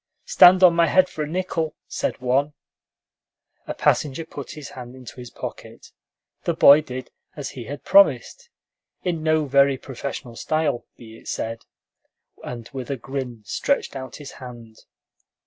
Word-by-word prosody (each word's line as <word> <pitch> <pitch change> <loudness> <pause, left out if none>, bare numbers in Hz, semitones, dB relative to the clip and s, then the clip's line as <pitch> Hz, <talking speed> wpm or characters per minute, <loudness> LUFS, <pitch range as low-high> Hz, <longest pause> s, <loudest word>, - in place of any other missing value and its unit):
"Stand 185 - +7
on 180 -2 +8
my 170 0 +3
head 185 0 +4
for 155 - -6
a - - -4
nickel?" 165 -2 -2
said - - -3
one. 135 +4 +1 1.1
A - - -4
passenger 150 +2 +1
put 145 -4 -8
his 150 -2 -9
hand 125 -1 -10
into 130 -1 -11
his 125 -1 -9
pocket; - - -9 0.5
the - - -1
boy 145 +2 +8
did 130 -3 -8 0.2
as 145 -2 -5
he 120 -3 -8
had 145 +4 -7
promised, 470 +11 +3 0.5
in 175 -3 -1
no 155 -1 +2
very 140 0 +4
professional 130 -2 -7
style, 150 -2 -1
be 115 -1 -13
it - - -17
said, 115 0 -4 0.8
and 120 -2 -7
with 130 -3 -6
a 140 - -2
grin 125 -3 -6
stretched 280 - -1
out 130 -1 -7
his 145 -2 -9
hand. 120 -4 -11
140 Hz, 155 wpm, -23 LUFS, 125-155 Hz, 1.1 s, on